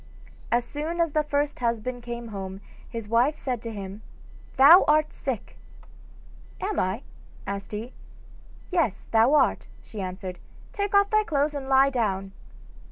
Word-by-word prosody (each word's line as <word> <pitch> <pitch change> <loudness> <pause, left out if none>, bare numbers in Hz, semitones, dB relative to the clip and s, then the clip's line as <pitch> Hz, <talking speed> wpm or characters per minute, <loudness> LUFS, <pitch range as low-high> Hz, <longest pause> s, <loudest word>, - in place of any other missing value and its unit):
As 240 0 +2
soon 315 +4 -4
as 335 -2 +2
the 305 +1 +2
first 290 0 -1
husband 240 +1 -2
came 235 -1 -6
home 190 -2 -6 0.3
his 230 -3 -6
wife 240 +7 +3
said 250 -6 -3
to 230 - -5
him: 200 0 -7 0.6
'Thou 295 +8 +9
art 305 0 +3
sick!' - - -5 1.0
'Am 410 +1 -2
I?' 190 +7 -1 0.4
asked 200 0 -5
he. 220 +4 -5 0.8
'Yes, 320 - 0
thou 230 +6 +5
art,' - - +2 0.2
she 215 - -8
answered; 185 -1 -6 0.3
'take 405 -1 -1
off 400 0 +4
thy 430 0 +4
clothes 300 -4 0
and 275 -2 -5
lie 270 +1 +5
down. 195 -6 -1
245 Hz, 150 wpm, -26 LUFS, 210-300 Hz, 1.0 s, Thou